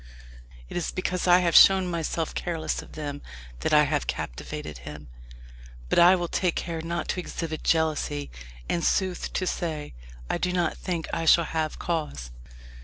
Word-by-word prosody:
It - - -9
is 175 - -1
because 185 0 -2
I 180 +1 +6
have 170 -2 +1
shown 190 -1 +8
myself 165 -1 -2
careless 160 -3 -2
of - - -14
them 145 -2 -5 0.4
that - - -1
I 150 0 +6
have 145 0 -1
captivated 65 +3 -5
him. 75 +1 -10 0.8
But - - +3
I 175 +2 +8
will 175 -1 -2
take 180 0 0
care 165 -2 -3
not 170 +1 -3
to - - -1
exhibit 165 -3 -5
jealousy, 150 - 0 0.4
and, 170 - -1
sooth 185 -2 0
to 185 - -1
say, 155 - -3 0.3
I - - -1
do 180 - 0
not 175 -3 0
think 170 -3 -3
I 165 - -1
shall 170 +1 +6
have 155 -1 -2
cause." 150 - -3
165 Hz, 170 wpm, -26 LUFS, 150-175 Hz, 0.8 s, shown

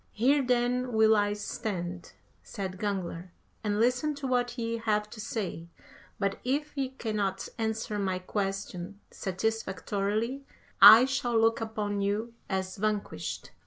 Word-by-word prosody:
"Here 270 +6 +3
then 250 0 +1
will 220 0 +5
I 205 0 +2
stand," 180 -4 -5 0.3
said 190 -2 -6
Gangler, 185 -4 -3 0.3
"and 210 -1 0
listen 250 +6 +2
to 280 -1 -6
what 245 -1 0
ye 230 -1 -2
have 210 -2 0
to 215 - -8
say, 200 -6 -4 0.5
but 200 -1 -1
if 290 +4 -1
ye 270 -2 -1
cannot 210 -7 -2
answer 220 -1 -2
my 190 -2 0
question 195 0 -4
satisfactorily 215 +4 -2 0.4
I 225 +4 +11
shall 260 -4 0
look 225 0 +3
upon 210 -2 -2
you 210 +4 -1 0.2
as 190 0 -2
vanquished." 210 0 -3
215 Hz, 130 wpm, -29 LUFS, 200-240 Hz, 0.5 s, I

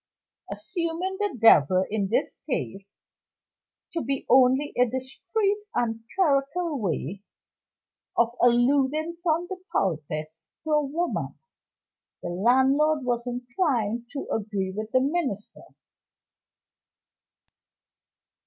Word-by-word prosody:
Assuming 350 +2 -3
"the 410 -9 -1
devil," 185 -4 +6
in 205 -2 0
this 210 - -1
case, 195 0 -3 1.0
to 335 - -1
be 270 +2 -3
only 260 +3 +4
a 250 0 +4
discreet 375 - -1 0.2
and 225 -2 0 0.2
clerical 300 -1 +1
way 190 - -3 1.0
of 235 0 +3
alluding 275 +7 +2
from 340 0 +1
the 380 - -5
pulpit 155 -3 -2 0.3
to 315 - -4
a 300 -1 +3
woman, 325 +5 -2 0.9
the - - -3
landlord 265 - +3
was 240 0 -1
inclined 245 - -1
to 280 - -5
agree 200 -3 -2
with 215 +1 -5
the 255 - +3
minister. 270 - -2
260 Hz, 100 wpm, -26 LUFS, 220-310 Hz, 1.0 s, devil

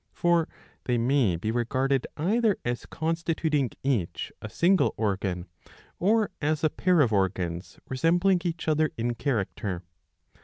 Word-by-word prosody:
For 170 -2 +2 0.4
they 125 -1 +1
may 120 -5 +2
be 105 +7 -2
regarded 130 +3 0
either 210 +6 +2
as 120 0 -3
constituting 160 -4 0
each 125 -11 -1
a 110 - -6
single 180 - +3
organ, 95 -4 -1 0.5
or 215 +3 +2
as 155 +1 0
a 155 - +3
pair 180 -3 +3
of 120 -6 +2
organs 90 -2 -1
resembling 175 +7 +2
each 170 -2 -3
other 155 0 +3
in 120 +1 0
character. 105 - -2
135 Hz, 130 wpm, -27 LUFS, 110-165 Hz, 0.5 s, single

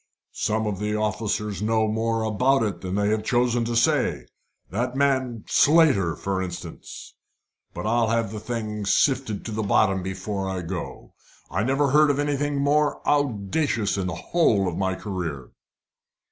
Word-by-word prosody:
"Some 110 +1 -1
of 105 -3 -2
the 105 0 -1
officers 105 -2 -2
know 110 0 +1
more 110 +1 0
about 125 +5 +2
it 100 -6 -3
than 95 0 -4
they 105 0 +1
have 110 0 0
chosen 120 0 +1
to 120 0 -2
say 115 - +2 0.5
that 120 +6 -2
man 130 -5 0
Slater, 140 - +4
for 95 -1 -2
instance. 90 -2 -8 0.6
But - - -5
I'll 115 +1 +2
have 115 -2 0
the 110 - -5
thing 105 -3 -4
sifted 130 -2 +1
to 115 - -5
the 110 +1 -2
bottom 100 -2 +2
before 95 +1 -4
I 95 -1 -3
go. 85 +1 -6 0.4
I 95 - 0
never 135 +3 +1
heard 150 +1 +5
of 140 - +1
anything 145 0 -1
more 145 +1 +1
audacious 120 -3 0
in 95 -2 -2
the 90 - -3
whole 105 - +2
of 90 - -2
my 95 0 -1
career." 85 - -5
110 Hz, 160 wpm, -24 LUFS, 100-130 Hz, 0.6 s, heard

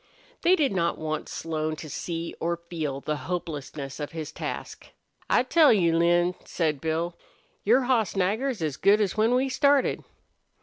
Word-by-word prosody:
They 360 +2 +5
did 295 -6 +1
not 170 -3 0
want 155 -1 -4
Slone 155 -1 -3
to 155 - -8
see 165 +3 -4
or 170 +1 -1
feel 160 -5 -4
the 150 +1 -2
hopelessness 150 -5 -5
of 145 +1 -5
his 155 -2 -5
task. - - -6 0.4
"I - - +4
tell 305 +3 +5
you, 170 -6 +3
Lin," 175 +1 +3
said 155 -5 -1
Bill, 165 +2 -1 0.5
"your 240 +6 +4
hoss 245 -5 +1
Nagger's 210 +3 0
as 150 -4 -2
good 200 +2 +4
as 205 -3 0
when 220 +3 +3
we 260 +2 +2
started." 280 +1 +2
170 Hz, 165 wpm, -26 LUFS, 155-220 Hz, 0.5 s, They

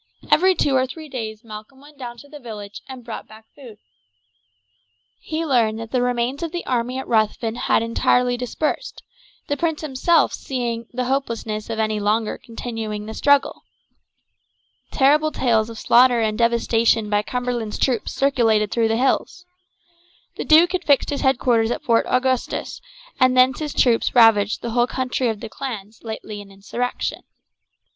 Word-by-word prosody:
Every 370 +4 +5
two 280 -5 +1
or 260 0 +2
three 310 +4 -9
days 220 -3 -6
Malcolm 215 +4 -11
went 290 +1 -18
down 240 -2 -7
to 285 - -14
the 295 0 -11
village 210 -5 -9
and 260 -2 -9
brought 230 - -7
back 220 +1 -15
food. 245 -7 -13 1.4
He 320 +1 -4
learned 230 -7 +2
that 225 -1 -8
the 255 - +1
remains 245 +2 -1
of 335 -2 -3
the 350 - -5
army 250 0 -1
at 265 - -5
Ruthven 220 0 +1
had 235 -1 +1
entirely 245 +2 +2
dispersed, 275 - -3 0.4
the 285 - 0
prince 320 +1 -1
himself 310 +3 +2
seeing 235 -3 -4
the 250 +1 -2
hopelessness 230 -5 -3
of 225 - -3
any 215 -1 0
longer 215 +2 0
continuing 225 -3 -5
the 220 - -7
struggle. 285 +3 +2 1.3
Terrible 300 +3 +3
tales 230 -5 +1
of 230 - -9
slaughter 245 +2 +4
and 215 -1 0
devastation 230 -1 +2
by 205 0 +1
Cumberland's 245 -2 -3
troops 250 -5 0
circulated 225 -6 +2
through 230 -1 +2
the 225 0 0
hills. 270 +8 0 0.9
The - - -5
duke 330 +3 +6
had 370 -1 -2
fixed 285 -3 +2
his 285 - -2
headquarters 245 -4 +2
at 295 +5 -3
Fort 230 -5 +2
Augustus, 255 0 -1 0.4
and 255 -1 +4
thence 255 0 +4
his 300 -2 -3
troops 240 -1 +2
ravaged 220 -4 +4
the 235 - -3
whole 240 +1 +2
country 255 -1 -1
of 220 -3 -3
the - - -5
clans 220 -5 -7
lately 220 -2 -6
in 200 - -14
insurrection. 205 +6 -4
240 Hz, 165 wpm, -21 LUFS, 220-265 Hz, 1.4 s, duke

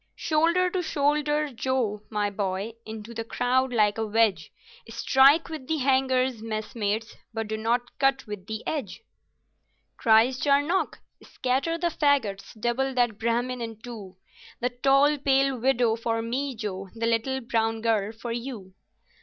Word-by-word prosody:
"Shoulder 335 +3 +2
to 370 - 0
shoulder, 295 -1 0
Joe, 235 -4 -1
my 210 -2 -1
boy, 200 +2 -3
into 220 +1 -8
the 230 - -4
crowd 255 +3 0
like 210 -2 +2
a 220 - -1
wedge 210 -7 +1 0.4
Strike 270 +7 +4
with 310 -6 -7
the 320 - 0
hangers, 260 -3 +1
messmates, 220 0 -3 0.2
but 225 -1 -2
do 220 - -2
not 235 +3 -1
cut 270 0 +2
with 205 -3 -8
the 220 0 -5
edge. 280 - -4 0.9
Cries 230 +3 +4
Charnock, 290 +6 +1 0.2
"Scatter 270 +6 -1
the 340 0 0
faggots, 225 -10 0
double 255 +4 0
that 240 -4 +1
Brahmin 240 +2 -1
in 225 -2 -6
two, 215 -6 -9 0.4
The 245 - 0
tall 275 +4 +3
pale 270 0 +2
widow 240 -2 +2
for 225 0 -2
me, 260 +3 -2
Joe, 195 -3 -5
the 230 0 -2
little 230 +3 0
brown 225 -2 -1
girl 220 -2 +1
for 230 +1 -7
you!" 230 -6 -6
240 Hz, 145 wpm, -26 LUFS, 220-270 Hz, 0.9 s, Strike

